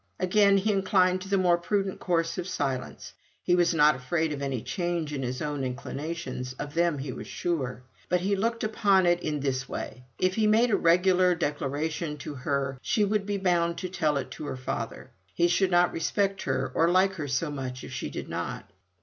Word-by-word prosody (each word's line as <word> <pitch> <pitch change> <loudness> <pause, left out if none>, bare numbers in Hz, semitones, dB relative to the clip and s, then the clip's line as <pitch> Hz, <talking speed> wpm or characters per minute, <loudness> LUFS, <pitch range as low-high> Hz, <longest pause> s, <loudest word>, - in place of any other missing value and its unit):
Again 200 +2 +4
he 205 +3 +1
inclined 185 -2 +2
to 195 - -8
the 200 - +3
more 175 -2 +3
prudent 195 +1 -1
course 165 -1 0
of 180 - -4
silence. 135 -7 -3 0.3
He 175 - +2
was 175 -1 +4
not 150 -3 +5
afraid 155 +5 -1
of 140 - -6
any 135 -4 -2
change 175 -4 -2
in 140 - -3
his 125 +1 -3
own 145 -2 -2
inclinations: 130 0 -4
of 145 +2 -7
them 170 -2 +2
he 135 -1 -4
was - - -8
sure. 130 -8 -3 0.3
But 180 0 +2
he 200 +2 +1
looked 230 +4 -1
upon 205 -4 +3
it 175 0 +3
in 150 -2 -2
this 135 -1 -2
way: 125 0 -6
If 185 0 +1
he 215 +1 +2
made 225 +3 +4
a - - +5
regular 180 +1 +4
declaration 150 0 -2
to 145 - -6
her 135 0 -2
she 210 - +1
would 205 0 0
be 205 -1 -1
bound 175 -3 +1
to 185 - -4
tell 155 -5 0
it 130 - -4
to 150 - -7
her - - -4
father. 130 - -5 0.2
He 170 - +4
should 185 +2 +2
not 175 0 +3
respect 195 +4 0
her 130 0 -1
or 165 +1 +3
like 190 +2 +4
her 145 - -3
so 140 +4 -1
much 130 -2 -5
if - - -8
she - - -4
did - - -6
not. 100 - -5
170 Hz, 210 wpm, -27 LUFS, 140-185 Hz, 0.3 s, not